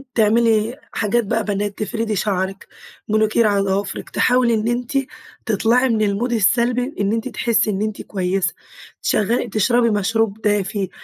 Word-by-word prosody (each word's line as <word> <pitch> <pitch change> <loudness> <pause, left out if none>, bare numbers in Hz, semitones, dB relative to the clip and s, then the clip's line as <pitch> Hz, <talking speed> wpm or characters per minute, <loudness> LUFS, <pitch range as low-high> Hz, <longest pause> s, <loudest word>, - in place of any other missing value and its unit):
تعملي 225 +2 +2
حاجات 230 +2 +1
بقى 225 +2 0
بنات، 205 0 -2
تفردي 220 +1 -2
شعرك، 195 -1 -2 0.4
مانيكير 215 +1 +2
على 200 -1 +2
ضوافرك، 195 0 -2
تحاولي 250 -1 +2
إن 220 0 0
أنتِ 245 +3 -1 0.5
تطلعي 230 +4 +2
من 225 -2 +1
المود 215 +4 0
السلبي، 235 +4 +2
بإن 200 -8 -2
أنتِ 225 +2 -2
تحسي 230 -3 +1
إن 200 -1 -1
أنتِ 215 -1 -3
كويسة، 190 -1 -1 0.5
شغّل 230 +3 0
تشربي 235 +3 +2
مشروب 220 0 0
دافي، 205 -2 0
215 Hz, 140 wpm, -20 LUFS, 200-235 Hz, 0.5 s, تعملي